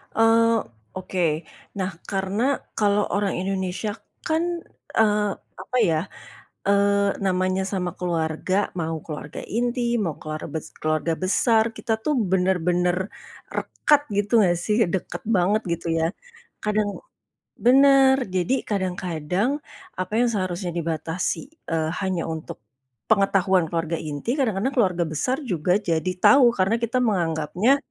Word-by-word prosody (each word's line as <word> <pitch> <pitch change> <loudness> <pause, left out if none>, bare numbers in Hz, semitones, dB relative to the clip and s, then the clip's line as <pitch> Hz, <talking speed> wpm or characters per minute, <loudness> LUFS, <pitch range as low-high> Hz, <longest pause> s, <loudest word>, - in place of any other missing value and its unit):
Eee, 225 +1 +4 0.4
oke 180 -2 0 0.5
nah 190 -1 -1 0.2
karena 195 +3 -1 0.3
kalo 205 -1 +3 0.2
orang 200 -1 0
Indonesia 190 +2 -2 0.4
kan, 320 +1 +1 0.5
eee, 210 -1 +3 0.3
apa 250 +7 -3
ya, 160 -1 +2 0.7
eee, 200 0 +3
namanya 185 0 +1
sama 180 -2 -1
keluarga, 170 +1 -1 0.2
mau 165 0 -2
keluarga 150 -2 -7 0.2
inti, 245 +1 0 0.2
mau 165 -5 -2
keluar 155 0 -5
bes 160 - -4 0.2
keluarga 155 +1 0
besar 220 +4 +3
kita 225 - -1
tuh 300 - +1 0.2
benar-benar, 180 -1 +2 0.6
rekat 295 -1 +2 0.2
gitu 205 0 0
gak 175 -1 +2
sih, 210 0 +1 0.2
dekat 190 - -3
banget 195 +4 +2
gitu 170 0 -6
ya, 160 - +2 0.6
kadang 210 -1 +1 0.8
benar 270 0 +7 0.2
jadi 185 +7 +1 0.2
kadang-kadang 180 - -1 0.5
apa 185 +2 -4
yang 245 - +3
seharusnya 185 -3 -2
dibatasi, 165 +1 -2 0.3
eee, 160 -1 +1
hanya 190 -3 -1
untuk, 160 - -8 0.5
pengetahuan 195 -4 +3
keluarga 165 0 -1
inti, 150 +9 -3
kadang-kadang 245 +1 0
keluarga 185 -9 +2
besar 160 - -1
juga 180 -4 +1
jadi 180 -3 0
tahu 275 -3 +8
karena 195 +4 +3
kita 235 +2 0
menganggapnya 180 - +2
190 Hz, 125 wpm, -24 LUFS, 170-215 Hz, 0.8 s, tahu